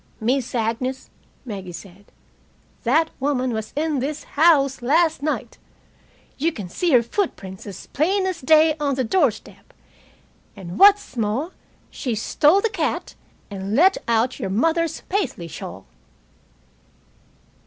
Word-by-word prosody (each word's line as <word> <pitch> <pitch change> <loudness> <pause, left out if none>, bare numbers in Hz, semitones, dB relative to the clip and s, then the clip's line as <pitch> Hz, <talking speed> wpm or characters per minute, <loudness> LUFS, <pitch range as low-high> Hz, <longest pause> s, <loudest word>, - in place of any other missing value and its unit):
"Miss 250 +3 -1
Agnes," 245 +3 -2 0.3
Maggie 195 -6 -6
said, 190 +3 -12 0.8
"that 315 +7 +2
woman 260 -3 0
was 220 -1 -4
in 300 -1 0
this 290 +4 -3
house 285 -4 +3
last 320 +5 +2
night. 305 +1 -3 0.8
You 325 +4 +1
can 205 - -7
see 350 - -1
her 240 -2 +6
footprints 215 - -4
as 195 - -9
plain 375 +6 0
as 370 -3 -3
day 310 +3 +5
on 285 -2 0
the 260 - 0
doorstep. 250 - -1 0.8
And 180 -1 -8
what's 405 -5 +6
more, 230 - -1 0.4
she 245 -4 -3
stole 300 - +3
the 455 - +1
cat - - -2 0.4
and 195 +1 -4
let 375 +7 +5
out 235 +2 +1
your 195 - -3
mother's 325 - 0
Paisley 375 - -3
shawl." 95 - -9
265 Hz, 130 wpm, -22 LUFS, 220-320 Hz, 0.8 s, her